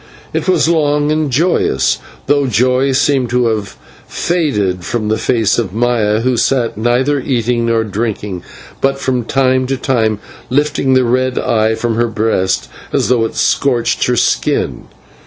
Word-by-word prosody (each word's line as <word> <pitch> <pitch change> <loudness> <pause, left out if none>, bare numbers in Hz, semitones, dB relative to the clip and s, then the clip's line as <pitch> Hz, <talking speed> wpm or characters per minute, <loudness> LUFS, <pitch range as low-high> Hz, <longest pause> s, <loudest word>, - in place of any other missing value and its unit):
It - - -2
was 175 -5 +3
long 150 -2 +1
and 155 -1 0
joyous, 135 - +1 0.3
though 145 -1 +2
joy 125 +4 +2
seemed 135 -1 +1
to 125 0 +1
have 105 -2 -5 0.3
faded 105 - -1
from 110 0 -2
the 110 - +1
face 115 -1 +1
of 105 -4 -3
Maya, 115 -2 +1
who 125 0 0
sat 120 0 +1
neither 125 +6 +1
eating 120 -2 -1
nor 115 -1 +1
drinking, 105 -3 -4 0.4
but 135 0 +1
from 130 -3 -1
time 130 0 +1
to 135 0 -1
time 115 -5 0 0.3
lifting 140 0 +1
the 130 - +4
red 130 +1 0
eye 110 0 +1
from 115 -1 -2
her 120 0 +2
breast 110 -4 0 0.2
as - - 0
though 120 -3 +2
it - - -5
scorched 125 -5 +1
her - - +1
skin. - - 0
120 Hz, 155 wpm, -15 LUFS, 110-135 Hz, 0.4 s, the